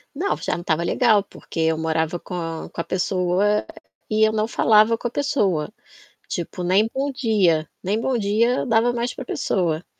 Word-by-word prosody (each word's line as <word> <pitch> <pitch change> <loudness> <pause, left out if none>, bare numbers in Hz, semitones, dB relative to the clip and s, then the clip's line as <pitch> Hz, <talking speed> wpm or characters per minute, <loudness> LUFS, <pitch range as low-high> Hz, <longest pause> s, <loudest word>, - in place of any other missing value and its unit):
Não, 385 +7 0
já - - -3
não 175 - -7
tava 165 0 0
legal, 215 +1 +3
porque 170 - -10
eu 160 0 +2
morava 160 +1 -1
com 165 -3 -5
com 170 - -4
a - - -4
pessoa 185 +3 0 0.4
e 215 0 +2
eu 215 - -1
não 215 0 +1
falava 225 0 +4
com 240 - -3
a - - -7
pessoa. 205 - 0 0.6
Tipo, 175 +1 -4
nem 195 +5 +3
bom 275 +1 -2
dia 195 - +1
nem 210 +5 0
bom 260 -1 0
dia 225 +4 +1
eu - - -3
dava 235 0 +3
mais 240 +1 -2
para 260 - -7
pessoa. 170 -7 -1
205 Hz, 185 wpm, -22 LUFS, 170-230 Hz, 0.6 s, falava